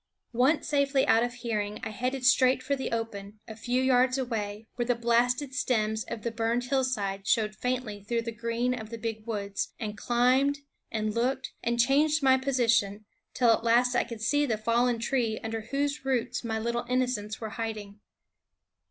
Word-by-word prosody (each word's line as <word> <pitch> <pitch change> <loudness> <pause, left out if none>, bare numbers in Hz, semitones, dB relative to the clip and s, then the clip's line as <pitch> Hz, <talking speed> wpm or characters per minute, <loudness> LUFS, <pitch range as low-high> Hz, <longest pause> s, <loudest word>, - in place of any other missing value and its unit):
Once 260 +6 +2
safely 280 -2 +2
out 225 - +4
of 240 - -1
hearing 215 -4 -3
I - - -3
headed 250 +4 -3
straight 255 0 +4
for 280 - 0
the 265 - -4
open, 210 -3 -4
a 220 - -8
few 245 +3 -1
yards 255 0 +3
away, 220 -4 -3
where 240 - -2
the 245 - +2
blasted 245 +4 +1
stems 220 -4 0
of 215 - -6
the 235 - -2
burned 230 +1 0
hillside 240 -7 -1
showed 215 -2 +2
faintly 245 -4 -3
through 230 +2 -1
the 230 - -4
green 230 +2 -1
of 220 -3 -6
the 230 - -6
big 225 -1 -5
woods, 200 -3 -3
and 215 -2 -4
climbed, 255 +6 +2 0.3
and 215 -1 -1
looked, 255 +3 -1
and 235 0 -1
changed 295 +5 +3
my 265 -1 +6
position, 235 -6 +1 0.3
till 245 -2 +4
at 225 - +2
last 240 +2 +3
I 245 - +2
could 230 -2 -8
see 290 +4 +2
the 225 -4 0
fallen 235 +2 +1
tree 230 -2 0
under 225 0 -3
whose 280 +5 -2
roots 260 -3 -1
my 225 -1 -2
little 235 +2 -2
innocents 250 -4 -1
were 220 - -5
hiding. 215 -2 -5
235 Hz, 180 wpm, -28 LUFS, 220-255 Hz, 0.3 s, my